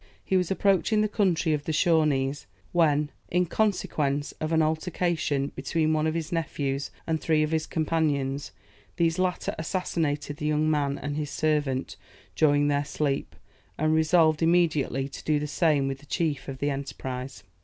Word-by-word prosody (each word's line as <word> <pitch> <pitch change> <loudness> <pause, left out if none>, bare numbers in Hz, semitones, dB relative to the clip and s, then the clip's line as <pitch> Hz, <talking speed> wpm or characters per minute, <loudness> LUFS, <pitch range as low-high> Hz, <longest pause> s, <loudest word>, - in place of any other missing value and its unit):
He 190 - 0
was 180 -2 +2
approaching 200 +2 +2
the 215 - +2
country 185 -6 +1
of 145 -1 -2
the - - -1
Shawnees, 150 -4 +2 0.2
when, 150 -3 +2 0.2
in 180 +1 +2
consequence 150 -8 0
of 155 +1 -2
an 160 -1 +4
altercation 160 -3 -1
between 155 +3 0
one 155 0 +1
of 160 - -1
his 165 -2 -3
nephews 145 -4 -2 0.2
and 160 -1 -1
three 155 -2 +2
of 155 - -2
his 160 -1 0
companions, 145 -4 -1 0.4
these 165 0 +1
latter 185 -1 0
assassinated 155 -4 -2
the 150 - -3
young 155 0 +2
man 140 -2 0
and 145 +1 -4
his 150 -2 -2
servant 145 -5 -1 0.4
during 145 -1 +3
their 145 0 +1
sleep, 145 -1 -2 0.4
and 155 +1 +2
resolved 160 0 +3
immediately 160 -5 +2
to 140 - -10
do 155 -1 +2
the 145 - -2
same 150 -2 +2
with 135 0 -3
the 145 - -18
chief 150 0 -1
of 135 -1 -5
the 145 +2 0
enterprise. 135 -1 -5
155 Hz, 165 wpm, -27 LUFS, 145-165 Hz, 0.4 s, an